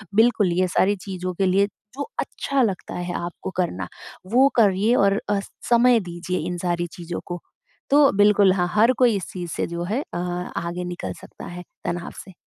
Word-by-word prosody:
बिल्कुल 220 -4 +4
ये 185 +1 +2
सारी 190 +3 +2
चीज़ों 185 -2 -4
के 195 +2 0
लिए 195 +2 +3 0.3
जो 285 - -2 0.2
अच्छा 275 -1 -1
लगता 200 -7 -1
है 175 0 -3
आपको 175 +2 -5
करना 95 - -1 0.5
वो 260 +3 +7
करिए 210 0 +4
और 200 -2 +3
अ, 205 -1 +2 0.3
समय 240 0 +5
दीजिए 180 -1 -4
इन 180 0 -3
सारी 175 0 -1
चीज़ों 175 -1 -5
को। 175 0 -5 0.5
तो 285 0 +6
बिल्कुल 205 -2 +5
हाँ, 180 -2 +1
हर 220 +4 +5
कोई 235 -5 +4
चीज़ 180 -1 -6
से - - -1
जो 170 0 -4
है 215 +10 -1
अ, - - -2
आगे 175 0 -3
निकल 175 0 -5
सकता - - -11
है 180 0 -7 0.2
तनाव 175 0 -3
से। 190 - -13
185 Hz, 185 wpm, -23 LUFS, 175-210 Hz, 0.5 s, वो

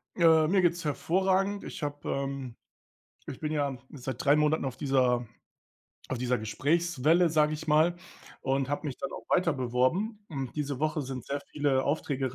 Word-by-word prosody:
Äh, 160 -3 +5
mir 190 +2 +3
geht's 175 -1 +1
hervorragend. 190 +6 +1
Ich - - -7
habe, 145 0 -4
ähm 135 -3 -3 0.7
ich 130 - -6
bin 155 0 -3
ja 140 -3 0
seit 135 +3 -6
3 140 0 +6
Monaten 150 0 +2
auf 130 -2 -3
dieser 125 -3 +2 0.8
auf 130 - -2
dieser 125 0 +1
Gesprächswelle, 160 +8 +2
sage 155 -1 +3
ich 155 +1 -8
mal, 160 +3 +4 0.5
und 135 0 0
habe 145 +1 -2
mich 130 - -6
dann 180 0 -4
auch - - -8
weiter 175 -3 +3
beworben 130 - 0
und 135 -5 -5
diese 145 -3 -2
Woche 155 0 0
sind 130 -3 -5
sehr 140 +1 -3
viele 140 -3 +1
Aufträge 135 -3 -1
145 Hz, 170 wpm, -29 LUFS, 135-165 Hz, 0.8 s, 3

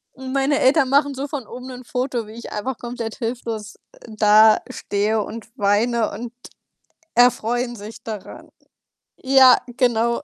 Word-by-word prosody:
Und 265 0 -7
meine 275 +1 +1
Eltern 265 0 +3
machen 280 +1 +3
so 275 +2 -4
von 275 -6 -6
oben 250 +2 -9
nur 255 - -7
'n 250 - -11
Foto, 250 -2 -3
wie 215 - -11
ich 235 +1 -9
einfach 230 +4 -4
komplett 235 -2 -6
hilflos, 225 -3 -5 0.2
äh, 220 - -13
dastehe 215 0 +3
und 225 +2 -9
weine 220 +2 +1
und 230 +3 -7 0.8
erfreuen 245 0 +2
sich 215 +1 -10
daran. 215 -3 -9 0.7
Ja, 265 -1 +6 0.2
genau. 235 -2 +1
235 Hz, 145 wpm, -21 LUFS, 220-260 Hz, 0.8 s, Ja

